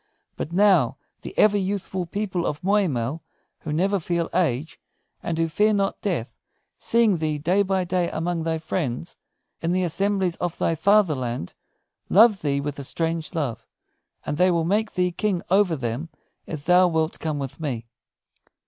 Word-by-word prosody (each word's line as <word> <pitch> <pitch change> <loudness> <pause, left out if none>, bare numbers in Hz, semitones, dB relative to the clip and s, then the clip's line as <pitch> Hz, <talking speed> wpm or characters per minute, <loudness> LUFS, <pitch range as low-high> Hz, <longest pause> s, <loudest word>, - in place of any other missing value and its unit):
But 155 - -5
now, 180 - +4 0.2
the - - -9
ever 205 -1 +5
youthful 190 -2 -3
people 190 -2 -2
of 150 - -4
Moy 200 +1 +3
mell, 135 +2 -2 0.4
who 155 - -6
never 190 +6 +1
feel 170 0 -2
age, 160 -3 0 0.4
and 165 - -3
who 165 0 +1
fear 210 +7 +2
not 195 -1 -1
death, 165 - -2 0.4
seeing 230 -5 +3
thee 155 -1 -1
day 175 +7 +2
by 190 -1 +1
day 180 -1 0
among 170 +1 -2
thy 160 0 -1
friends, 160 -2 -3 0.4
in 170 +1 -1
the 185 0 +1
assemblies 185 +1 0
of 175 -2 -3
thy - - +1
fatherland, 150 - +1 0.6
love 215 0 +6
thee 140 -2 0
with 145 0 -4
a - - -4
strange 165 +4 -2
love, 120 -8 -3 0.6
and 145 - -2
they 185 +2 +4
will 170 -2 +1
make 215 +5 0
thee 180 -2 +1
King 185 0 -1
over 190 -3 +4
them 130 +4 -4 0.4
if 155 -3 -6
thou 180 +1 +6
wilt 160 -2 -1
come 155 -2 -2
with 140 +1 -5
me." 130 -7 -3
170 Hz, 165 wpm, -24 LUFS, 150-190 Hz, 0.6 s, love